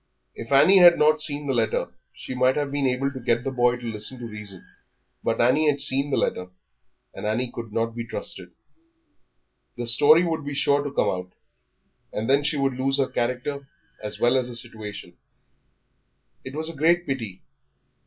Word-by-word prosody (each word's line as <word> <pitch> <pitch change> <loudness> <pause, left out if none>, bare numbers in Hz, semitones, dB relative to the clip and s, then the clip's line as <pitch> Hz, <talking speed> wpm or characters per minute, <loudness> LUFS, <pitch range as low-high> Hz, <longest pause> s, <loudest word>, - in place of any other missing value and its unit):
If 115 - -9
Annie 150 +8 +6
had 175 -1 +8
not 155 0 +3
seen 145 -1 -2
the 135 - -1
letter 115 -3 -1 0.2
she - - -8
might 130 +1 +2
have 145 -2 -2
been 140 -1 0
able 130 +2 -1
to 130 - -8
get 120 -1 0
the 135 - -3
boy 125 -1 +2
to 125 0 -10
listen 110 +3 0
to 120 - -8
reason; 105 -4 -9 0.6
but - - -1
Annie 145 +6 +3
had 145 -1 0
seen 140 0 +2
the 140 - 0
letter, 90 - -1 0.7
and - - -6
Annie 120 +3 -1
could 115 -2 -7
not 115 +1 -2
be 115 0 -5
trusted. - - -5 1.3
The 120 - -4
story 150 +8 +6
would 160 -3 -2
be 145 0 -5
sure 140 +1 +2
to 145 - -5
come - - +1
out, 90 0 -5 0.8
and 110 +2 -4
then 140 +2 +3
she 150 +1 0
would 135 -2 -1
lose 135 +1 +1
her 135 -2 0
character 130 +3 -3 0.3
as 105 -1 -3
well 120 +2 +3
as 125 -2 -1
her 120 - -4
situation. 110 -3 -6 1.3
It 130 +2 -9
was 160 +1 -1
a 165 - -4
great 170 +4 +2
pity. 115 -9 -5
130 Hz, 190 wpm, -24 LUFS, 115-145 Hz, 1.3 s, had